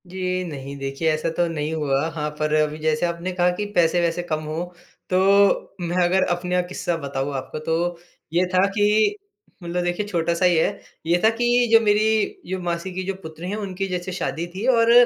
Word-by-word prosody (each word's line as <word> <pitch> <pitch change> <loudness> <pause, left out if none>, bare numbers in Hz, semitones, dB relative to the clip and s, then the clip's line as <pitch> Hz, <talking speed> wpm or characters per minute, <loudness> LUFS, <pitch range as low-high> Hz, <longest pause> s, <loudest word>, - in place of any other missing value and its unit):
जी 185 0 -2
नहीं, 140 -5 -7
देखिए 135 +4 -1
ऐसा 155 +2 -1
तो 175 - +3
नहीं 155 -1 -3
हुआ। 145 -1 0
हाँ, 150 -2 -3
पर 155 0 0
अभी 155 0 +1
जैसे 155 +1 +1
आपने 170 +2 -3
कहा 180 0 +2
कि 210 - -2
पैसे-वैसे 170 0 +2
कम 155 -1 -1
हों, 155 +3 -3 0.4
तो 195 +2 +3
मैं 175 +1 +1
अगर 185 +2 +3
अपने 180 +1 -3
अ, 180 - +3
किस्सा 175 -1 -2
बताऊँ 140 -2 -3
आपको 130 +3 -6
तो 165 +2 -1 0.3
ये 175 +2 +3
था 185 +1 +5
कि 210 - +3 0.5
मतलब 175 +1 -2
देखिए 175 +4 -1
छोटा-सा 170 -1 0
ही 180 -1 +4
है, 160 - +1 0.3
ये 170 +2 +3
था 220 - +7
कि 240 +1 +2
जो 225 - +8
मेरी 215 +1 +3 0.2
जो 190 0 -2
मासी 175 +1 -3
की 185 +1 -3
जो 195 - -1
पुत्री 160 +3 -7
हैं, 205 - -2
उनकी 195 -2 -3
जैसे 180 0 -3
शादी 170 -2 -3
थी 200 +5 -3
और 230 -2 +4
175 Hz, 200 wpm, -23 LUFS, 160-190 Hz, 0.5 s, जो